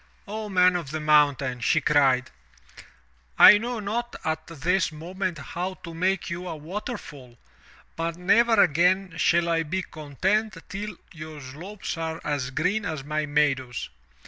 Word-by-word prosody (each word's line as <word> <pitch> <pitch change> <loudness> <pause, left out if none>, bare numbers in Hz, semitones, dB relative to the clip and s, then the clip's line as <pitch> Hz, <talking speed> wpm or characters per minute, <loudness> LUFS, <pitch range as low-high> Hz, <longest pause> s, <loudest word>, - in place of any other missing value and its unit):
0 215 +1 -5
Man 185 -1 +4
of 170 -6 -3
the 155 +2 -3
Mountain," 145 -4 +3
she 140 +6 +2
cried, 140 -4 +2 1.1
'1 210 - +9
know 240 0 -3
not 230 +4 -3
at 160 0 -2
this 165 +3 0
moment 175 +3 -4
how 175 +6 -5
to 170 -2 -10
make 185 +3 0
you 175 +2 -5
a 165 - -4
waterfall, 155 - -7 0.6
but 165 0 -3
never 230 +6 +3
again 180 +3 +2
shall 170 +1 +3
I 165 -1 +1
be 175 +4 -2
content 185 +9 -2
till 205 +2 -6 0.2
your 155 -2 -9
slopes 165 +8 -7
are 160 0 -3
as 145 -4 -2
green 180 +10 0
as 155 -7 -4
my 150 +1 -2
meadows. 135 -4 0
165 Hz, 145 wpm, -25 LUFS, 150-190 Hz, 1.1 s, 1